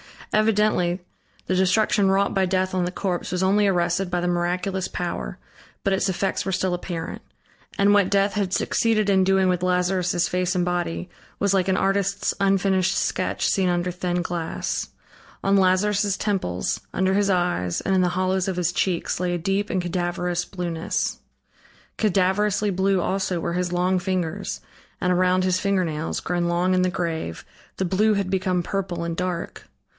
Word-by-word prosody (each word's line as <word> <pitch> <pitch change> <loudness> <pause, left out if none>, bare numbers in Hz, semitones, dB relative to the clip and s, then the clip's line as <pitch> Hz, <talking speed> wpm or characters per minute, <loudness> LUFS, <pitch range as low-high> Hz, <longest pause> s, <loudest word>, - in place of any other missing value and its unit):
Evidently, 210 -4 +2 0.4
the 185 - 0
destruction 195 +1 +3
wrought 195 +1 +2
by 195 -1 +2
death 185 0 0
on 185 -1 +1
the 180 - -2
corpse 180 -3 -3
was 180 0 0
only 200 +2 +3
arrested 175 0 +1
by 180 -1 -1
the 175 - -1
miraculous 180 +2 -1
power, 65 - -4 0.5
but 195 - +1
its 190 - +1
effects 190 +1 -1
were 190 - -1
still 185 0 0
apparent; 175 -2 -5 0.6
and 200 +1 +4
what 200 -2 +4
death 200 0 +2
had 200 -3 -1
succeeded 215 -1 +1
in 190 -1 +4
doing 190 -1 +3
with 180 -1 0
Lazarus' 180 -1 +1
face 180 +1 0
and 180 - +2
body, 175 0 -2 0.3
was 200 -1 +1
like 190 -1 +2
an 190 - +2
artist's 200 +1 +1
unfinished 195 -1 +2
sketch - - -1
seen 190 -3 +2
under 175 0 0
thin 180 0 -2
glass. 170 -1 -3 0.5
On 195 0 +3
Lazarus' 195 +2 +2
temples, 190 - -1
under 190 0 +1
his 200 0 +2
eyes, 175 - 0
and 195 - 0
in 190 - +4
the 180 - +2
hollows 185 +1 0
of 190 - -1
his 175 -1 0
cheeks, 175 -1 -1
lay 180 -1 0
a - - -1
deep 195 +4 -1
and 185 - 0
cadaverous 175 0 -2
blueness; 175 -3 -3 0.8
cadaverously 205 +1 +2
blue 190 0 +1
also 190 -1 -1
were 170 - -2
his 180 0 -1
long 180 +1 +2
fingers, 180 -3 -3 0.4
and 180 - +2
around 185 +1 +2
his 185 0 +1
fingernails, 180 -6 -1
grown 175 0 -1
long 175 +2 +1
in 185 - +3
the 185 - +2
grave, 165 - -3 0.3
the 190 - -1
blue 210 +4 +2
had 200 -2 -1
become 185 -2 0
purple 180 -3 -3
and 170 0 -3
dark. 180 -2 -4
185 Hz, 170 wpm, -24 LUFS, 175-195 Hz, 0.8 s, and